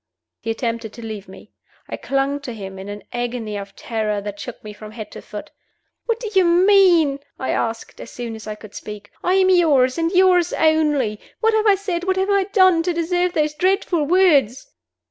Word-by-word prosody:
He 225 - -6
attempted 230 -1 -3
to 235 - -9
leave 210 -3 -7
me. 190 +2 -14 0.4
I - - -5
clung 275 +1 -1
to 265 -4 -7
him 190 -2 -8
in 195 +1 -8
an 205 0 -7
agony 240 -3 -3
of 200 -1 -7
terror 215 -2 -2
that 205 0 -7
shook 245 - -8
me 210 -1 -8
from 215 +1 -11
head 215 -2 -8
to - - -9
foot. - - -9 0.6
"What 460 -1 0
do 470 - -5
you 380 -1 +5
mean?" 350 -5 +4 0.2
I 260 - -2
asked, 230 0 -3
as - - -9
soon 240 -2 -6
as 220 0 -11
I 215 - -4
could 210 -1 -14
speak. 210 -1 -9
"I 365 - +2
am 375 -1 +4
yours 295 -6 +3
and 330 0 0
yours 365 -2 +4
only. 300 -9 +2 0.2
What 450 0 +2
have 435 0 +2
I 405 - +6
said, 365 -3 -3
what 375 0 0
have 385 +2 +1
I 395 -1 +3
done, 375 -4 +4
to 350 +1 -1
deserve 355 +1 0
those 300 -1 0
dreadful 360 -1 +1
words?" 325 - +3
290 Hz, 205 wpm, -21 LUFS, 220-365 Hz, 0.6 s, I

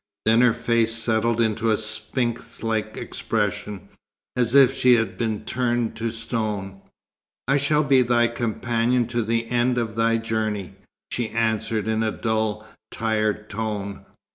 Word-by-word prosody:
Then 115 +2 +5
her 125 -2 +4
face 115 -1 +1
settled 115 0 +1
into 115 0 +1
a 110 - +3
sphinx 115 +2 -3
like 110 -1 -2
expression, 105 -2 -3 0.5
as 125 0 +1
if 135 -3 +7
she 125 -1 +5
had 115 -1 0
been 110 -2 -2
turned 120 -1 -1
to 115 +1 -1
stone. 110 -4 -3 0.7
"I 140 +1 +3
shall 150 +2 +2
be 135 -2 +4
thy 120 -1 +3
companion 120 +1 0
to 120 -1 0
the 115 +1 0
end 125 +1 +2
of 115 -3 -2
thy 115 0 +2
journey," 110 -4 -2 0.4
she 120 -2 -2
answered 110 -1 -1
in 110 0 +1
a 110 - +1
dull, 110 -1 -2 0.2
tired 110 -1 -1
tone. 105 -2 -4
115 Hz, 145 wpm, -23 LUFS, 110-120 Hz, 0.7 s, if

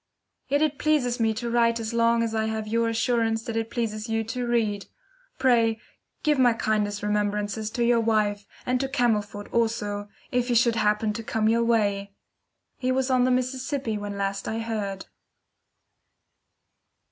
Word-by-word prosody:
Yet 285 +3 +2
it 300 -2 0
pleases 265 -6 +1
me 225 -1 +3
to 240 +1 -3
write 230 -1 +3
as 225 0 -4
long 230 0 +3
as 225 -1 -2
I 220 0 0
have 220 -1 -3
your 230 +1 +1
assurance 225 -1 +1
that 230 -2 -5
it 225 0 -1
pleases 225 -2 -3
you 225 0 0
to 245 +2 -3
read. 215 -4 0 0.5
Pray, 230 -4 +3 0.4
give 300 -3 +2
my 245 -2 +5
kindest 210 -2 -1
remembrances 210 +1 -1
to 240 +1 -1
your 235 0 +4
wife, 210 -2 +1 0.2
and 250 0 +1
to 270 0 -1
Camelford 210 -6 0
also, 210 -3 -1 0.2
if 245 -1 +1
he 245 - +1
should 235 0 +3
happen 210 0 +1
to 230 +1 -5
come 220 -1 0
your 230 +1 +3
way. 200 -4 0 0.6
He 255 0 0
was 260 0 0
on 250 -1 +4
the - - +2
Mississippi 255 -1 -1
when 205 -1 -5
last 195 0 -2
I 220 - -2
heard. 210 -4 -3
225 Hz, 170 wpm, -26 LUFS, 210-240 Hz, 0.6 s, my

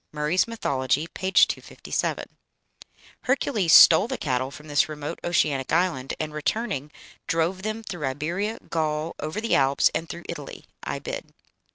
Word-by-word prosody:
(Murray's 150 +6 +1
"Mythology," 140 - -1
p. 185 +3 -4
257.) - - +1 1.0
Hercules 240 - +1
stole 170 +5 +9
the - - -3
cattle 130 -2 -1
from 150 +2 -12
this 145 +1 +2
remote 150 -1 -5
oceanic 145 -6 0
island, 160 -6 0
and, 155 -1 -3
returning 150 - -2 0.4
drove 165 +3 0
them 215 +2 -4
"through 175 -9 -4
Iberia, 170 +11 -2
Gaul, 155 0 -2
over 155 +7 -4
the 230 +1 -1
Alps, 135 0 +4
and 165 +1 -3
through 170 - -7
Italy." - - -8 0.2
(Ibid.) - - -5
160 Hz, 140 wpm, -25 LUFS, 145-190 Hz, 1.0 s, stole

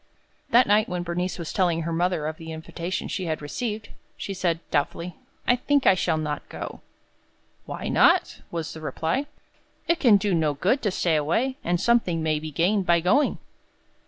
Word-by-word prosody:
That 250 -1 +6
night 210 +2 +3
when 180 -1 -2
Bernice 180 +1 -2
was 170 -3 -5
telling 170 -3 +1
her 165 +1 -2
mother 175 -2 0
of 155 0 -3
the 160 0 -8
invitation 170 +3 -4
she 185 - -3
had 155 -2 -2
received, 210 +8 -4 0.3
she 200 - -4
said, 175 -3 0
doubtfully, 170 +3 -1 0.3
"I 245 - +4
think 285 +2 +1
I - - +7
shall 180 -3 0
not 150 -2 -4
go." - - -7 0.9
"Why - - -5
not?" - - +3
was 165 -2 -4
the 160 - -9
reply. 165 - -1 0.6
"It 340 0 +2
can 235 -9 +6
do 200 0 0
no 155 -3 +1
good 200 - +1
to 210 - +1
stay 175 -3 +1
away, 225 - 0
and 175 0 0
something 185 -7 +2
may 155 -1 +1
be 155 +1 -6
gained 180 +6 +1
by 170 0 +5
going." 240 - +2
175 Hz, 185 wpm, -25 LUFS, 160-210 Hz, 0.9 s, I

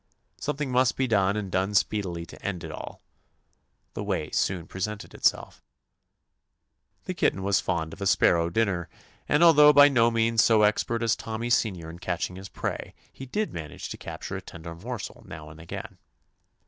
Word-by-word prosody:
Some 150 - -2
thing 145 -3 -3
must 125 0 +2
be 135 - +2
done 100 -4 +2
and 100 -3 -4
done 95 +2 0
speed 105 0 +2
ily 85 -2 -5
to 85 - -13
end 90 -4 -3
it 80 - -6
all. - - -9 0.9
The - - -4
way - - -2
soon 90 -3 0
pre 95 - -9
sented 105 +1 -4
itself. - - 0 1.4
The - - -3
kitten 95 - 0
was 100 0 +2
fond 80 -3 -2
of - - -12
a 100 - 0
sparrow 85 -2 +3
dinner, 90 -3 0 0.4
and 150 +3 +4
although 150 -3 +8
by 145 0 +8
no 120 -4 +4
means 115 -1 +3
so 110 -2 +5
expert 115 +2 +1
as 115 -1 +2
Tommy 115 +2 -4
Senior 90 -9 0
in 85 - -11
catching 90 0 -3
his 95 +1 -9
prey, - - -5 0.2
he 135 - -9
did 210 +11 -2
manage 75 -4 -7
to - - -6
capture - - -7
a - - -5
tender 85 0 -9
morsel 110 +5 -7
now 75 -1 -9
and 80 - -14
again. 85 - -8
100 Hz, 185 wpm, -26 LUFS, 85-115 Hz, 1.4 s, although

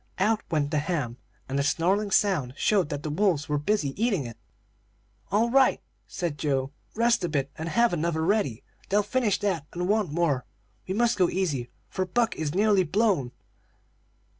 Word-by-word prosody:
Out 215 +3 +2
went 145 -3 0
the 150 - +2
ham, 145 -7 -2 0.3
and 135 +1 -1
a - - +2
snarling 190 +8 +1
sound 185 -12 +1
showed 195 -7 +2
that 145 0 -4
the 155 - -3
wolves 165 -3 +1
were 150 -1 0
busy 150 -3 0
eating 200 - +1
it. 115 -1 -7 1.0
"'All 225 +4 +2
right!' 265 0 +4 0.3
said 165 -5 -4
Joe. 135 -2 0 0.2
'Rest 230 -2 +2
a 175 - 0
bit, 140 -3 -1
and 160 +1 -4
have 235 +3 +3
another 160 -1 0
ready. 180 - 0 0.3
They'll 205 +1 +3
soon 205 - -19
finish 240 -6 +2
that 175 -7 -1
and 175 +1 -2
want 205 -5 +1
more. 150 -6 +1 0.4
We 190 - -2
must 235 -1 +2
go 180 - +4
easy, 145 -10 -1 0.2
for 185 0 -3
Buck 230 +5 +1
is 155 0 -3
nearly 205 -1 +4
blown.' 180 - +1
175 Hz, 180 wpm, -26 LUFS, 145-210 Hz, 1.0 s, right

